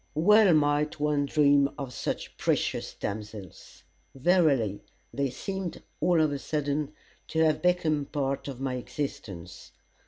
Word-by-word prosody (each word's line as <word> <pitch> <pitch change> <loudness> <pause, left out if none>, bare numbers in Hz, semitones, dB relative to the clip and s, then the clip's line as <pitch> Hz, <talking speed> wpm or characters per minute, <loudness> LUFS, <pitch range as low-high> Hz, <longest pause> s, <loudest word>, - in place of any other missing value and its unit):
Well 200 +3 +6
might 150 0 +1
one 145 -1 +1
dream 140 -1 +4
of 135 -3 -6
such - - -4
precious - - -1
damsels. 105 -3 -7 0.3
Verily, 135 - +2 0.3
they 140 -1 0
seemed, 190 +6 -5 0.2
all 175 -2 +3
of 155 -2 +2
a 140 - -3
sudden, 150 0 -2 0.4
to 160 0 +1
have 155 -1 +1
become 170 -4 +2
a - - -5
part 140 -2 -2
of 135 -3 -6
my 130 -1 -2
existence. 115 - -6
145 Hz, 135 wpm, -28 LUFS, 135-155 Hz, 0.4 s, Well